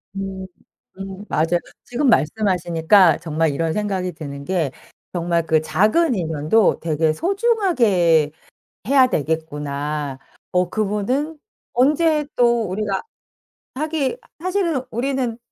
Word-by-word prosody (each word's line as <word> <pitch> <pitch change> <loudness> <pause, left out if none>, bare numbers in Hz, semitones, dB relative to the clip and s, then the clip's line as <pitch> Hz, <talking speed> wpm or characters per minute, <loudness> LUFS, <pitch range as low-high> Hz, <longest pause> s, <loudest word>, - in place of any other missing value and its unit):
음. 195 -1 -5 0.5
음 195 +1 -7
맞아요. 165 +3 +1 0.2
지금 270 +4 -1
말씀하시니까 175 -2 +3
정말 160 -1 0
이런 160 +2 -1
생각이 190 -4 -2
드는 140 -3 -8
게 170 -6 0 0.4
정말 170 -1 0
'그 160 -1 +2
작은 235 - +2
인연도 165 +4 +2
되게 155 -1 +1
소중하게 245 - +2 0.6
해야 270 -1 +5
되겠구나.' 150 - -3 0.3
어 180 -1 +1
그분은 220 +9 -1 0.3
언제 300 +3 +2
또 235 -1 +3
우리가 195 +1 -2 0.7
하기에 310 - -1 0.2
사실은 360 -6 0
우리는 245 -1 -2
190 Hz, 240 characters per minute, -21 LUFS, 160-255 Hz, 0.7 s, 해야